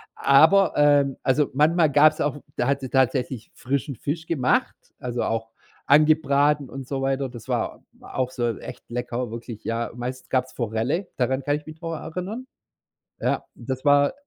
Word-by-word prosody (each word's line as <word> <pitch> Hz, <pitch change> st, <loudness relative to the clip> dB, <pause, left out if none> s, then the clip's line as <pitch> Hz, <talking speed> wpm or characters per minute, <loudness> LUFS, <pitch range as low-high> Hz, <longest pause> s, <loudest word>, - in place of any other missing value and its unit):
Aber 160 Hz, +7 st, +5 dB
ähm, 145 Hz, -2 st, +4 dB
also 140 Hz, +2 st, +2 dB
manchmal 155 Hz, +2 st, +3 dB
gab's 155 Hz, +2 st, +5 dB
auch 145 Hz, -1 st, -2 dB
da 120 Hz, -, +1 dB
hat 140 Hz, 0 st, +1 dB
sie 130 Hz, -, -5 dB
tatsächlich 130 Hz, -2 st, 0 dB
frischen 140 Hz, +1 st, -2 dB
Fisch 160 Hz, +7 st, -4 dB
gemacht, 130 Hz, -6 st, +1 dB, 0.2 s
also 125 Hz, -1 st, -3 dB
auch 115 Hz, 0 st, -2 dB, 0.4 s
angebraten 145 Hz, -1 st, +4 dB
und 135 Hz, -1 st, -8 dB
so 135 Hz, -1 st, -3 dB
weiter. 135 Hz, 0 st, 0 dB
Das 120 Hz, -3 st, -11 dB
war -, -, -2 dB, 0.2 s
auch 130 Hz, -1 st, -3 dB
so 120 Hz, -3 st, -1 dB
echt 125 Hz, -, -10 dB
lecker, 120 Hz, -1 st, -3 dB
wirklich, 115 Hz, -1 st, -8 dB
ja. 115 Hz, +1 st, -2 dB
Meistens 125 Hz, +1 st, -6 dB
gab's 130 Hz, 0 st, 0 dB
Forelle, 120 Hz, -, -1 dB
daran 130 Hz, +2 st, 0 dB
kann 145 Hz, +1 st, +1 dB
ich 150 Hz, -, -13 dB
mich 155 Hz, +1 st, -11 dB
noch 165 Hz, -1 st, -4 dB
erinnern. 185 Hz, +11 st, -5 dB, 0.7 s
Ja, -, -, -1 dB
das 130 Hz, +3 st, -5 dB
war 145 Hz, -, +5 dB
135 Hz, 165 wpm, -24 LUFS, 125-150 Hz, 0.7 s, Aber